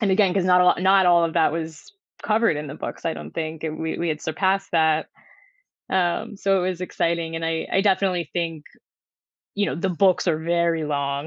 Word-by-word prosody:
and 205 -3 +1
again, 190 -1 +3
'cause 190 - +1
not 180 0 +5
a 180 - +5
lo - - +6
not 190 0 +4
all 170 -1 +5
of 165 0 -3
that 165 -2 +3
was 160 - -6 0.3
covered 215 -6 +2
in 150 - -5
the 140 - -7
books, - - -7
I 165 - -1
don't - - -9
think 160 -1 -5
an 155 0 -4
we 160 0 -3
we 170 - -1
had 155 -1 -2
surpassed 190 +4 -1
that. 160 -1 +2 0.8
Um, 185 +2 -1
so 195 0 +1
it 185 - 0
was 185 -1 -5
exciting, 170 -2 -2
and 165 - -4
I 165 0 -2
I 195 - +3
definitely 185 -5 +1
think, 165 -3 -3 0.9
you 205 0 0
know, - - -2
the 190 +4 -2
books 185 +1 +2
are 155 - +1
very 170 -1 0
long, 140 0 -2
170 Hz, 220 wpm, -23 LUFS, 160-190 Hz, 0.9 s, lo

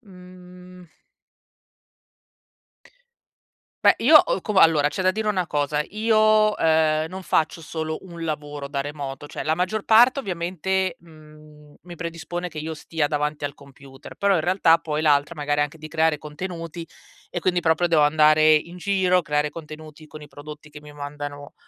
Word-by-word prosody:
mhmm 180 -3 -15 2.9
beh - - +7
io - - +9
ho - - 0
cu 215 - -3
va 190 - +4
allora 155 -3 +5
c'è 190 - -5
da 185 0 +3
dire 215 +3 -4
una 185 -4 0
cosa, 150 0 -1
io, 215 0 +3
ehm, 160 -1 +2
non 190 +2 -8
faccio 165 -1 0
solo 160 0 -4
un 170 -3 -9
lavoro 145 -2 -5
da 140 -1 -3
remoto, 145 -1 -7
cioè - - -7
la 155 - 0
maggior 185 +5 -2
parte 240 +5 +5
ovviamente, 185 - -2
mhmm, 150 -2 -18
mi 175 0 -12
predispone 170 +1 -5
che 155 - -9
io 160 +1 -5
stia 155 -1 -2
davanti 150 0 -2
al 140 - -8
computer, 140 -1 -15
però 200 -1 +2
in 165 - +2
realtà 175 -1 +4
poi 155 -2 -4
l'altra 150 +1 +2
magari 145 -1 0
anche 150 +2 -5
di 155 0 -9
creare 160 -1 +1
contenuti 165 +2 -7 0.4
e 175 - -4
quindi 180 0 +1
proprio 165 +1 +1
devo 160 -3 +3
andare 155 +1 +5
in 170 +4 -2
giro, 185 -1 +1
creare 150 -1 0
contenuti 155 0 -11
con 155 +1 -12
i 150 - -12
prodotti 150 +1 -11
che 150 0 -13
mi 150 0 -13
mandano, 145 0 -8
160 Hz, 165 wpm, -23 LUFS, 150-180 Hz, 2.9 s, io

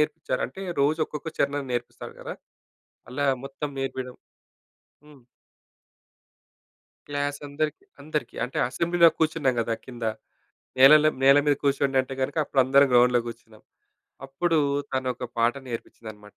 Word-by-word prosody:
నేర్పిచ్చారు. 150 -3 -1
అంటే 190 +10 -10 0.2
రోజొక్కొక్క 155 +1 0
చరణం 140 0 0
నేర్పిస్తాడు 120 0 -6
కదా! - - -6 0.8
అలా 140 +3 -1 0.2
మొత్తం 140 +2 -5
నేర్పియడం 130 -1 -4 0.9
హ్మ్. 145 -4 -17 1.9
క్లాసందరికీ, 145 - -3 0.2
అందరికీ. 150 0 -4
అంటే 130 - -5
అసెంబ్లీలో 170 +3 +4
కూర్చున్నాం 155 -5 +1
గదా! 115 0 -1
కింద. 120 -2 -7 0.7
నేలలం 150 +3 +7
నేల 135 +1 +7
మీద 145 - +4
కూసోండంటే 135 -1 +1
గనక, 140 +4 -3
అప్పుడు 135 - +1
అందరం 140 +2 +5
గ్రౌండ్‌లో 125 0 +5
కూర్చున్నాం. 115 -2 -11 0.6
అప్పుడు 160 +4 0 0.3
తనొక 130 -1 -2
పాట 115 +1 +3
నేర్పించిందనమాట. 110 -3 -9
135 Hz, 110 wpm, -25 LUFS, 125-150 Hz, 1.9 s, నేలలం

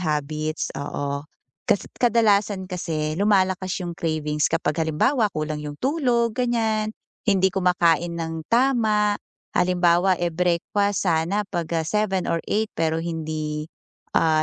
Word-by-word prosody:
habits, 155 -1 -2
oo. 140 0 -3 0.4
Kasi 200 - +1
kadalasan 210 -5 +2
kasi 160 -4 -2
lumalakas 190 -2 +2
'yong 175 -1 -4
cravings 155 -4 0
kapag 165 0 0
halimbawa 210 - +2
kulang 155 -1 -3
'yong 145 0 -7
tulog, 245 -6 +1
ganiyan, 225 -3 0 0.3
hindi 190 -3 +2
kumakain 175 -2 +2
ng 165 -1 -4
tama. 225 -4 +3 0.4
Halimbawa, 180 0 +3
eh, 175 -2 -1
breakfast 180 +4 0
sana 175 +5 +1
'pag, 170 -4 -4
ah, 160 - -2
7 195 -1 0
or 165 - 0
8 220 +1 +2
pero 160 0 0
hindi, 155 -2 -4 0.5
ah, 155 -1 +3
175 Hz, 125 wpm, -23 LUFS, 160-210 Hz, 0.5 s, tama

